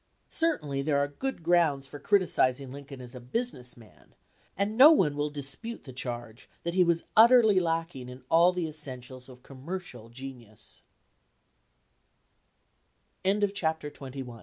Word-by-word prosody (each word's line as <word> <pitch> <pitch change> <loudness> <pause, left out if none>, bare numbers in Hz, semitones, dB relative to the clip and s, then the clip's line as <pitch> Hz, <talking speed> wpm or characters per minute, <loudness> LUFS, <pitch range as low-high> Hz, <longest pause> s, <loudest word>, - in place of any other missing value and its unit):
Certainly 150 - 0
there 145 0 +1
are 140 0 +2
good 215 - -4
grounds 160 -5 +2
for 145 +2 -10
criticizing 140 -8 +1
Lincoln 140 -1 -10
as 125 0 -9
a 125 - -8
business 125 - -3
man, 110 -3 -19 0.4
and 200 +3 -1
no 270 +6 +10
one 160 - +3
will 145 +1 -1
dis 140 -2 -3
pute 230 +9 -7
the 130 - -10
charge 120 -2 -6
that 170 - -2
he 185 0 +4
was 170 -1 +1
utterly 225 -3 +7
lacking 165 -6 -2
in 125 0 -11
all 170 +4 +5
the 180 -2 -2
essentials 130 -4 -7
of 125 -1 -15
commercial 135 -4 -8
gen 120 -3 -10
145 Hz, 135 wpm, -28 LUFS, 130-175 Hz, 0.4 s, no